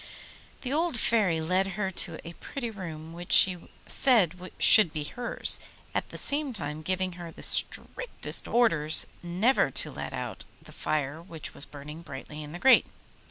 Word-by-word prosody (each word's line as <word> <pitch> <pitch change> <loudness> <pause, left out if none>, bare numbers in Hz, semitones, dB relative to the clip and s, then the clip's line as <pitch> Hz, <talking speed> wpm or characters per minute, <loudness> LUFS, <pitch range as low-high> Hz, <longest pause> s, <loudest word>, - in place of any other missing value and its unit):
The 260 +1 -4
old 325 -3 -1
Fairy 205 -8 +1
led 185 +4 -1
her 190 -2 -2
to - - +1
a 170 - -8
pretty 240 +5 -7
room 165 -6 -9
which 175 +1 -9
she 180 -3 +5 0.2
said 185 - +1
should 205 -7 +8
be 155 -1 -4
hers, 240 +10 -2 0.3
at - - -3
the - - -9
same 285 -2 0
time 150 -6 -6
giving 185 +2 -2
her 170 - -8
the - - -10
strictest - - +2
orders 165 -11 +1 0.2
never 185 +10 +1
to - - -1
let - - -7
out - - -6 0.2
the - - -16
fire 150 0 -3
which 165 -3 -9
was 140 - -4
burning 150 +2 -11
brightly 150 -1 -10
in 150 0 -10
the 175 - -7
grate. 260 +7 +4
180 Hz, 165 wpm, -27 LUFS, 155-225 Hz, 0.3 s, should